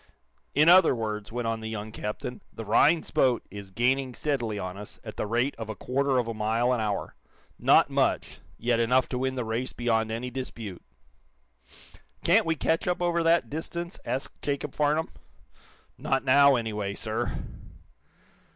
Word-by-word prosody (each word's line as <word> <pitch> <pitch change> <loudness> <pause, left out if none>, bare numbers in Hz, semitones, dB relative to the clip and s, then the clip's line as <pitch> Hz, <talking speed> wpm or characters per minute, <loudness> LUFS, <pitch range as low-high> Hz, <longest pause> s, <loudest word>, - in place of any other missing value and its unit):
"In 150 +3 +5
other 180 -5 +7
words," 105 -2 -4
went 120 0 -2
on 115 0 -1
the 110 0 -5
young 110 0 -5
captain, 110 +3 -5
"the 115 - -8
Rhinds 150 +10 +3
boat 125 -3 +2
is 100 -1 -8
gaining 125 +4 0
steadily 120 -8 -1
on 90 -2 -4
us 105 +1 -10
at - - -8
the - - -3
rate 120 +6 +1
of 110 -1 -5
a 110 - -4
quarter 135 +4 0
of 120 -2 +1
a 115 - -2
mile 115 +3 +1
an 120 - 0
hour. 105 -2 -2 0.5
Not - - +5
much, - - 0 0.2
yet 120 0 +1
enough 125 +2 +3
to 125 - -2
win 130 0 -1
the 125 -2 -2
race 115 +3 -3
beyond 115 -2 0
any 120 +3 -4
dispute." 115 -7 -6 1.4
"Can't - - +4
we 165 - +2
catch 160 +2 0
up 180 - 0
over 175 -1 +1
that 165 +1 +3
distance?" 170 +3 -5
asked 130 - -4
Jacob 145 -1 -3
Farnum. 150 +2 +1 0.9
"Not 135 0 0
now, 140 +1 +6
anyway, 105 -4 -2
sir." 110 +3 -3
120 Hz, 170 wpm, -27 LUFS, 110-140 Hz, 1.4 s, other